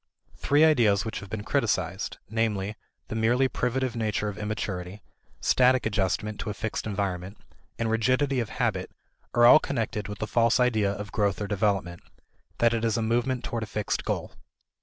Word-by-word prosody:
Three 145 +2 +4
ideas 115 -10 +3
which 110 - -4
have 105 - -10
been 105 +1 -4
criticized, 105 - -1
namely, 110 -2 -1 0.3
the - - -4
merely 120 +4 +3
privative 130 0 -1
nature 105 -2 -1
of 105 - -7
immaturity, 100 -2 -4 0.4
static 130 0 +3
adjustment 105 0 -1
to 110 - -4
a 105 - -4
fixed 110 +1 -3
environment, 100 -2 -3 0.4
and 115 - -1
rigidity 130 +5 +1
of 115 -3 -2
habit, 110 -8 -1 0.5
are 120 0 +6
all 140 +6 +9
connected 110 -8 -3
with 105 -1 -7
a - - 0
false 115 +2 +2
idea 110 -5 +2
of 100 0 -6
growth 100 -2 0
or 105 - -2
development, 100 -4 -1 0.6
that 115 0 +3
it 115 -1 -1
is 115 0 +1
a 115 - 0
movement 120 +2 0
toward 115 - -3
a 110 - -4
fixed 105 -1 -2
goal. - - -3
110 Hz, 175 wpm, -27 LUFS, 100-120 Hz, 0.6 s, all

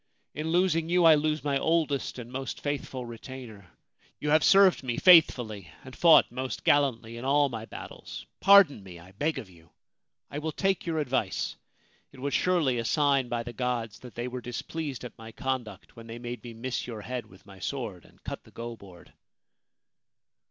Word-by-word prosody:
In 155 +3 -4
losing 165 -2 +2
you 175 0 +3
I 165 - +9
lose 155 0 0
my 140 -2 0
oldest 155 -5 0
and 120 -1 -8
most 135 +1 -5
faithful 135 -3 -4
retainer. 115 -4 -10 0.5
You 150 - -1
have 155 0 +5
served 195 -2 +6
me 125 -3 -3
faithfully 120 - +5
and 130 - -11
fought 170 -2 +6
most 130 0 -5
gallantly 120 -5 +2
in 120 - -7
all 140 +1 +3
my 115 -3 -6
battles. - - -9
Pardon 195 - +6
me, 95 -3 -11
I 85 +2 -15
beg 150 +11 -1
of 110 - -6
you! 85 -3 -19 0.6
I 145 - -4
will 155 0 -4
take 195 0 0
your 165 -1 -1
advice. 130 -9 -1 0.6
It - - -15
was 140 +1 -3
surely 155 -7 +2
a - - -1
sign 135 +1 +2
by 120 -1 -2
the 120 0 -8
gods 120 -3 -3
that 125 -2 -12
they 120 +1 -3
were 125 0 -5
displeased 135 +3 -5
at 125 - -8
my 115 0 -10
conduct 120 -5 -5
when 115 0 -12
they 115 +1 -7
made 120 0 -7
me 120 -2 -9
miss 125 +2 -4
your 115 -3 -6
head 120 0 -5
with 95 -1 -19
my 95 -1 -14
sword 105 -6 -5
and - - -22
cut - - -6
the - - -18
go 115 0 -7
board.' 95 -5 -16
130 Hz, 190 wpm, -28 LUFS, 115-150 Hz, 0.6 s, I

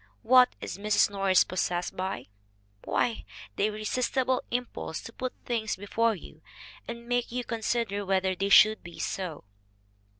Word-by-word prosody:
What 250 +2 +6
is - - -6
Mrs. 210 0 +3
Norris 195 -2 +4
possessed 175 -1 -2
by? 190 +1 -3 0.6
Why, 235 -2 0 0.3
the 205 - +2
irresistible 250 +4 0
impulse 245 -9 -3
to 230 - -9
put 255 0 -3
things 225 -3 -1
before 220 +3 0
you 160 -3 -13 0.5
and 235 0 -7
make 245 -1 0
you 250 +1 -2
con 230 -1 -4
sider 215 -3 -1
whether 190 -1 +1
they 195 +2 -2
should 215 +2 +7
be 175 -1 -11
so. 180 -6 -4
215 Hz, 145 wpm, -28 LUFS, 190-240 Hz, 0.6 s, should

